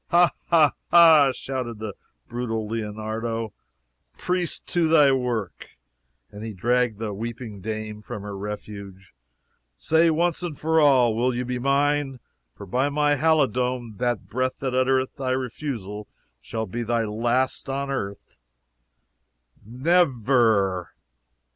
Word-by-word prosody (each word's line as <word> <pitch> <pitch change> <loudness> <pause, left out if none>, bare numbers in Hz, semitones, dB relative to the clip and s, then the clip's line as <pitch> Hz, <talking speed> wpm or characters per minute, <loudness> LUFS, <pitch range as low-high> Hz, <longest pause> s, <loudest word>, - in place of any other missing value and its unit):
"Ha! 175 0 +5 0.2
ha! 160 -4 +5 0.2
ha!" 160 -5 +7
shouted 130 -3 -5
the 110 -1 -5 0.3
brutal 115 -3 -3
Leonardo. 110 +1 -4 0.6
"Priest, 180 -1 -2
to 175 -2 +2
thy 150 -3 +6
work!" 120 - -3 0.5
and 105 +1 -9
he 110 -1 -5
dragged 120 +2 +1
the 110 -1 -4
weeping 115 -1 -6
dame 110 +1 -5
from 100 0 -7
her 105 -1 -6
refuge. 100 -1 -8 0.6
"Say, 160 - +3
once 170 +2 0
for 160 +1 +2
all, 130 -6 +5
will 125 +2 +1
you 125 +1 -2
be 125 0 -3
mine? 140 0 +1 0.4
for 100 - -9
by 125 +8 0
my 145 0 +2
halidome, 125 -6 +1
that 120 -2 -1
breath 130 +1 -1
that 130 -2 -3
uttereth 130 0 +1
thy 130 -2 -1
refusal 115 -5 -4 0.3
shall 110 0 -4
be 115 +5 -5
thy 115 0 0
last 120 +6 -1
on 140 +1 -2
earth!" 100 -7 -5 1.2
"NE 155 - +3 0.2
VER?" 100 - +2
125 Hz, 130 wpm, -24 LUFS, 110-140 Hz, 1.2 s, ha